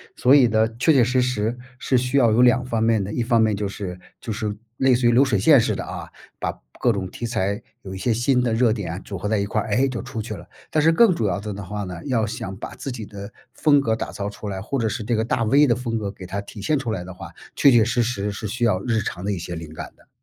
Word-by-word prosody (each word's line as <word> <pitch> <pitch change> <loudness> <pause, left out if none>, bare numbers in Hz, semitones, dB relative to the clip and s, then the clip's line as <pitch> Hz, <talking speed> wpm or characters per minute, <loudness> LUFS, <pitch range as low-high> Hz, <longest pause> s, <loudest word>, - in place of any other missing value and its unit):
所 130 +2 +4
以 135 -4 +7
呢， 110 0 +3
确 160 - +4
确 130 -4 +5
实 125 +2 +2
实 120 -1 -1 0.2
是 130 0 +1
需 125 +3 0
要 120 -4 +5
有 115 +3 +4
两 125 +1 +4
方 115 -3 -1
面 115 -3 +2
的， 100 - -5
一 120 - -1
方 115 -1 +3
面 110 -1 +3
就 100 0 -2
是 95 -2 -6 0.2
就 115 - -5
是 105 -1 -3 0.2
类 130 -1 +4
似 120 0 +2
于 120 - +5
流 130 +4 +5
水 115 -6 +1
线 140 +8 +6
似 115 - 0
的 - - -4
啊， - - -7 0.3
把 - - -3 0.2
各 120 -2 +3
种 95 -2 -3
题 120 - -5
材 100 -3 -1 0.2
有 95 -1 -8
一 - - -5
些 115 +4 0
新 125 +3 +2
的 120 -2 0
热 115 0 +3
点 95 -4 -4
组 100 - -6
合 95 - -4
在 105 0 +1
一 100 - 0
块 105 +1 -1
儿， - - -6
诶， 130 +6 +2
就 125 -3 -4
出 120 -3 -5
去 110 0 -6
了。 - - -11 0.2
但 155 - +2
是 165 +2 +4
更 225 0 +5
主 115 -10 -1
要 95 - 0
的 105 +1 -5
呢 100 +1 -6
话 105 +2 -5
呢， 90 -3 -6
要 115 -6 +1
想 95 -3 -5
把 100 - -8
自 - - -6
己 115 -4 -6
的 100 0 -9 0.2
风 145 -2 +4
格 115 -5 0
打 110 - -3
造 100 0 -3
出 105 0 -8
来， 95 -1 -4
或 135 +6 -2
者 115 - +1
是 110 +2 -3
这 115 +1 0
个 110 - 0
大 115 0 0
V 140 +7 +4
的 120 - +3
风 120 -2 -3
格 105 -2 -3
给 95 -2 -11
它 95 +3 -4
体 100 0 -9
现 150 +6 +1
出 120 -4 -3
来 90 - -4
的 95 +1 -9
话， 90 - -10 0.3
确 140 - +6
确 120 -3 +6
实 120 +2 +1
实 105 -4 -1
是 105 +2 -5
需 120 +4 -4
要 105 -6 +3
日 115 -2 +1
常 95 -2 -5
的 105 - 0
一 - - -3
些 85 +1 -6
灵 80 -2 -7
感 - - -7
的。 - - -25
110 Hz, 320 characters per minute, -23 LUFS, 100-125 Hz, 0.3 s, 以